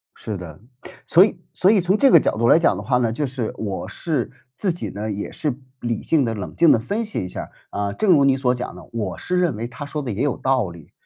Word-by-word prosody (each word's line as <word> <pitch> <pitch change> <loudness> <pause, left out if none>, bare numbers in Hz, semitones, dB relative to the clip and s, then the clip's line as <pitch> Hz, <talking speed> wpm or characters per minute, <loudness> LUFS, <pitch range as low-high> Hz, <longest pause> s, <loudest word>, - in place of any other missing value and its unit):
是 105 -3 -5
的。 85 -3 -9 0.5
所 180 +4 +7
以 205 - -2
所 185 - +3
以 210 -3 +5
从 180 +3 +2
这 270 +4 +5
个 - - +9
角 - - 0
度 115 +1 +2
来 155 - +7
讲 165 - +3
的 - - -5
话 125 -2 +1
呢， 115 -2 +1
就 145 +5 -1
是 125 -4 -3
我 100 -3 -4
是 160 -3 -2 0.3
自 190 -4 0
己 175 - -5
呢， 105 +2 -4
也 100 0 -4
是 150 -5 -2 0.3
理 115 -2 -2
性 155 -5 +2
地 115 - -1
冷 100 -4 -6
静 170 -2 +6
地 - - +4
分 205 - -2
析 210 - -3
一 - - -5
下 - - -6
儿， - - -10 0.2
啊， 100 0 -2
正 200 - +1
如 145 -6 +6
你 135 -1 +4
所 125 -2 +1
讲 125 0 -5
的， - - -13
我 105 -5 -3
是 180 0 -1
认 170 -11 +1
为 115 - -3
他 125 +4 -8
说 150 +1 -4
得 130 - -4
也 105 - -2
有 145 -3 0
道 130 -7 +1
理， 85 -3 -14
125 Hz, 295 characters per minute, -22 LUFS, 110-165 Hz, 0.5 s, 个